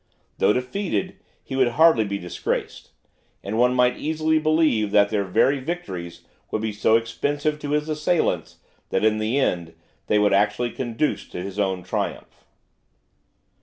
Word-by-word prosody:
Though - - +4
defeated, 185 - -2 0.3
he 130 - -6
would 130 -2 +3
hardly 160 -6 +5
be 100 -1 -3
disgraced; 90 -3 -4 0.5
and 100 +2 -4
one 125 +1 +4
might 125 0 +2
easily 155 0 +1
believe 155 -9 +2
that 100 0 +4
their 105 -2 0
very 135 +9 +2
victories 130 - -6 0.3
would 110 - -2
be 110 -1 -2
so 110 +2 +3
expensive 145 +6 -1
to 145 - -6
his 150 +1 0
assailants, 155 - 0 0.3
that, 95 - +1
in 110 0 +2
the 110 +5 0
end, 85 -11 -1 0.3
they 105 - +3
would 105 -1 +3
actually 105 +4 +1
conduce 120 +4 -2
to 90 - -6
his 100 +1 -6
own 95 -2 0
triumph. - - -5
115 Hz, 155 wpm, -23 LUFS, 100-150 Hz, 0.5 s, hardly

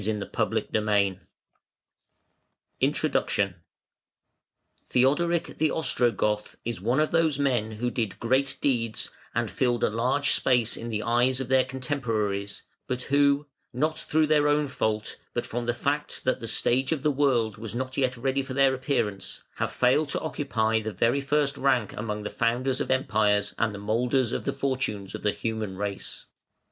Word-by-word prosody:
INTRODUCTION. 100 -2 +1 1.3
Theodoric 165 +7 +2
the 155 0 +3
Ostrogoth 120 -8 +1
is 115 -5 -3
one 120 +7 +1
of 155 - +2
those 160 -4 +2
men 125 -6 0
who 120 +3 -2
did 115 -6 -2
great 130 +3 +1
deeds 115 -5 0 0.2
and - - 0
filled 120 -2 0
a - - +3
large 130 +6 +1
space 120 -3 +2
in 115 - -6
the 110 -1 -2
eyes 120 +3 +2
of 130 -2 -4
their 130 -1 +5
contemporaries, 115 -7 -2 0.2
but 125 0 -2
who, 140 +1 +3 0.3
not 155 +6 -1
through 155 0 +2
their 150 -1 +3
own 145 0 +3
fault, 110 -5 -2 0.2
but 120 - -1
from 120 0 -4
the 120 - +2
fact 145 +4 -2
that 130 - +1
the 115 - -6
stage 130 +5 +1
of 155 -5 -1
the 150 - +3
world 130 -6 +1
was 115 0 -6
not 130 +1 -3
yet 130 -2 0
ready 135 +3 0
for 130 -1 -6
their 135 -1 +4
appearance, 125 -7 -2
have - - -1
failed 130 +4 +2
to - - +1
occupy 120 -7 0
the 110 0 -4
very 120 +6 +1
first 140 0 +1
rank 130 -6 +1
among 105 -1 -4
the 105 - -4
founders 125 +3 0
of - - -3
empires 105 -5 +2
and 115 -1 +2
the 100 - -7
moulders 120 +4 +1
of - - -3
the - - 0
fortunes 130 -8 -2
of - - -6
the 105 - +2
human 110 -4 -4
race. 100 -1 -4
125 Hz, 160 wpm, -27 LUFS, 110-140 Hz, 1.3 s, their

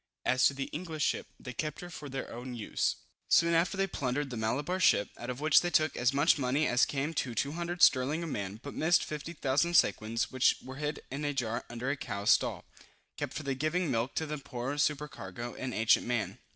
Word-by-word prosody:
As 130 0 +4
to 140 - -2
the 135 - -2
English 160 -2 -3
ship, - - -1
they 125 - -7
kept 150 +3 -3
her 175 0 -8
for 150 -3 -8
their 135 0 -5
own 125 +1 -6
use. 110 -3 -1 0.3
Soon 170 0 +5
after 170 +4 +2
they 195 - +2
plundered 140 -5 -2
the - - -4
Malabar 140 +11 -1
ship, 105 - +4
out 120 - -7
of 125 +1 -4
which 155 0 +5
they 175 - -1
took 155 -2 +2
as 125 +1 +2
much 145 +3 +3
money 135 +4 +1
as 125 -3 +3
came 145 +3 -2
to 125 -6 -2
£200 170 +8 -1
sterling 140 +5 +4
a - - -3
man, 100 - -4
but 140 - -7
missed 170 +3 +3
50,000 150 +1 -1
sequins, 115 -4 +2
which 130 -1 +4
were 130 0 -8
hid 150 +1 -3
in 140 +3 -4
a 145 -1 -1
jar 115 -3 -2
under 120 +3 -2
a - - 0
cow's 100 -5 0
stall, - - +2 0.5
kept - - -4
for 155 - -4
the 140 -1 -1
giving 155 +4 0
milk 120 +2 -1
to 160 - 0
the 150 -1 -5
Moor 125 +3 -3
supercargo, 135 -7 -2
an 130 -1 -4
ancient 115 0 +3
man. 120 -2 -2
140 Hz, 215 wpm, -31 LUFS, 125-155 Hz, 0.5 s, Soon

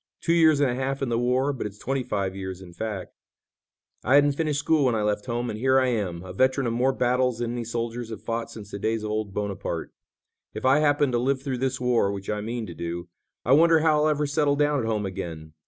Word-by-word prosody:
Two 165 - +1
years 160 -3 +5
and 140 -3 +3
a - - -1
half 135 +2 -2
in 130 - -1
the 115 0 +1
war, 130 +3 +1
but 125 - -3
it's 105 0 -12
twenty 135 +5 -2
five 100 -5 -2
years 95 -1 -5
in 90 -2 -12
fact. 105 -1 -5 0.9
I 130 - +4
hadn't 145 0 +6
finished 150 0 -1
school 145 0 +2
when 125 -3 +2
I 110 - 0
left 105 +3 -1
home 120 0 -2
and 105 - -6
here 130 +2 +4
I 130 -1 +2
am, 95 -7 -2
a 90 -1 -8
veteran 130 +5 +2
of 115 - 0
more 125 +3 +2
battles 125 -1 +1
than 120 -1 -2
any 120 0 -3
soldiers 115 0 -4
have 110 -2 -8
fought 115 0 -3
since 105 -2 -10
the 100 - -5
days 110 +1 -1
of 105 - -3
old 110 -1 -2
Bonaparte. 100 0 -4 0.6
If - - -5
I 135 +3 +5
happen 145 -2 +3
to 120 - +1
live 135 +2 0
through 130 -3 -3
this 130 0 -1
war, 120 -5 +2
which 100 0 -4
I 105 0 -2
mean 115 +1 -4
to 85 - -8
do, 85 +1 -5 0.4
I 125 - +1
wonder 160 +3 +6
how 155 -1 +3
I'll 155 - +3
ever 150 -1 +1
settle 145 0 +1
down 145 0 +2
at 115 - -2
home 105 -2 -1
again. 85 -5 -6
120 Hz, 255 wpm, -25 LUFS, 105-135 Hz, 0.9 s, hadn't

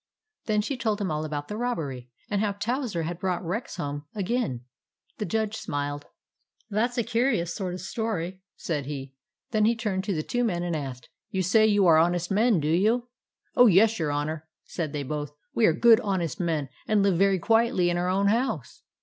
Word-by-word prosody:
" 435 0 -58
Then 210 -1 +2
she 270 +4 -3
told 220 -3 0
him 195 -4 -1
all 155 0 -1
about 150 -1 -4
the 210 - -5
robbery, 145 - -3 0.2
and 205 -1 0
how 210 -2 0
Towser 220 - -2
had 170 +2 -4
brought 180 -2 -2
Rex 205 +9 -3
home 145 -3 -4
again. 200 - -1 0.6
The 210 - -2
Judge 220 +2 -1
smiled. 145 -3 -4 0.3
" - - -42
That 220 +4 +1
's 245 - -11
a 235 - +2
curious 230 -7 +1
sort 185 -3 -3
of 180 - -7
story/' 190 -3 -3 0.2
said 145 -5 -3
he. 135 -2 -6 0.4
Then 215 -2 +3
he 230 +2 +3
turned 210 -5 -2
to 195 - -1
the 155 - -1
two 245 +7 -1
men 175 -7 0
and 175 -2 -1
asked, 135 -4 -5 0.3
11 200 - -5
You 185 - +2
say 215 +4 +4
you 205 -2 +4
are 165 -2 +7
honest 175 +2 +2
men, 215 -1 +3
do 150 - -1
you? 220 +9 +2 0.2
" - - -66
" - - -44
Oh, 245 - +7
yes, 215 +3 +5
your 155 -3 0
Honour," 155 +2 -3 0.2
said 160 -4 -4
they 145 -1 -3
both. 145 +1 -4
" - - -50
We 225 - +4
are - - +5
good, 225 +6 +6
honest 185 -8 -2
men, 160 -6 -1 0.2
and 210 -2 +3
live 190 -4 +2
very 195 -1 +4
quietly 225 -2 +2
in 175 - 0
our 180 +1 0
own 200 +2 +2
house." 225 - -1
185 Hz, 225 wpm, -26 LUFS, 160-220 Hz, 0.6 s, are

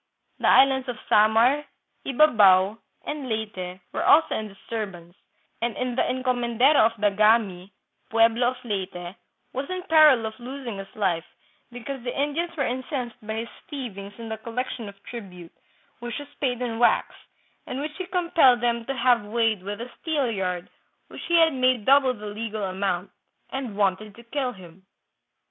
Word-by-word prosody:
" - - -46
The - - +1
islands 265 -1 +5
of 240 - -4
Samar, 225 +7 +4 0.4
Ybabao, 215 -8 +5 0.3
and 295 -3 -5
Leyte 190 -5 -4
were - - -1
also 320 +2 +5
hi 215 - -3
disturbance, 195 -4 -7 0.5
and 235 0 -1 0.2
the - - +2
encomendero 255 +2 +2
of 225 - -6
Dagami, 205 -2 +2 0.4
pueblo 230 +2 +3
of 255 +1 -1
Leyte, 185 -4 -4 0.4
was 270 +2 -4
in 370 0 -4
peril 305 - +6
of 220 +2 -6
losing 250 -3 -6
his 195 - -7
life, 180 -6 0 0.5
because 250 +2 -6
the 245 +2 -4
Indians 330 +4 -1
were 275 - +1
incensed 250 -1 -4
by 220 +1 -4
his - - -14 0.2
thievings 205 -9 -7
in 230 -1 -8
the 220 - -4
collection 230 0 -5
of 200 - -13
tribute, 180 -8 -9 0.5
which 240 0 -5
was 290 -1 -10
paid 250 -3 -1
in 230 -2 -3
wax, 240 - +3 0.5
and 255 - -4
which 300 +2 -5
he 370 - -4
compelled 335 -8 +4
them 235 -1 0
to 270 - -3
have 240 -2 +3
weighed 220 -1 0
with 205 +2 -6
a 245 +1 -7
steelyard 215 - -1 0.4
which - - -9
he 345 - +2
had 325 -2 +5
made 255 -4 +1
double 270 -2 +5
the 210 -1 -10
legal 215 0 -4
amount, 190 -1 -2 0.4
and 255 -6 -5
wanted 200 +1 0
to 235 - -14
kill 255 +1 -2
him. 185 -1 -15
235 Hz, 160 wpm, -25 LUFS, 205-265 Hz, 0.5 s, peril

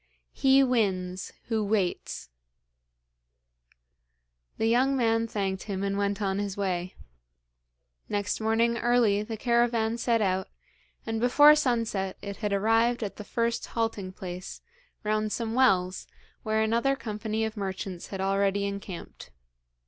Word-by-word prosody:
"He 270 0 +5
wins 190 -7 0
who 220 -2 -1
waits."' 200 - -1 2.3
The - - 0
young 255 +4 +3
man 225 -2 +2
thanked 195 -4 -2
him 195 -1 -2
and 200 0 -1
went 200 0 -1
on 195 0 0
his 200 -1 -3
way. 185 -2 -2 1.1
Next 205 +1 -1
morning 230 +2 +2
early 235 -4 +3
the 220 +1 -5
caravan 235 -1 +1
set 235 -1 +2
out, 190 -2 0 0.6
and 225 -1 -2
before 290 +5 +7
sunset 230 -9 0
it 200 -1 -5
had 210 -2 -2
arrived 225 +4 +2
at 200 - -5
the 210 - -6
first 230 +2 -1
halting 220 -5 -2
place, 180 -1 -7 0.4
round 215 0 0
some 225 0 -2
wells, 190 -7 +2 0.3
where 220 0 +1
another 235 +5 +2
company 220 -2 -3
of 220 0 -4
merchants 190 -3 -5
had 195 - -6
already 195 +1 +1
encamped. 200 - -7
215 Hz, 130 wpm, -28 LUFS, 195-230 Hz, 2.3 s, before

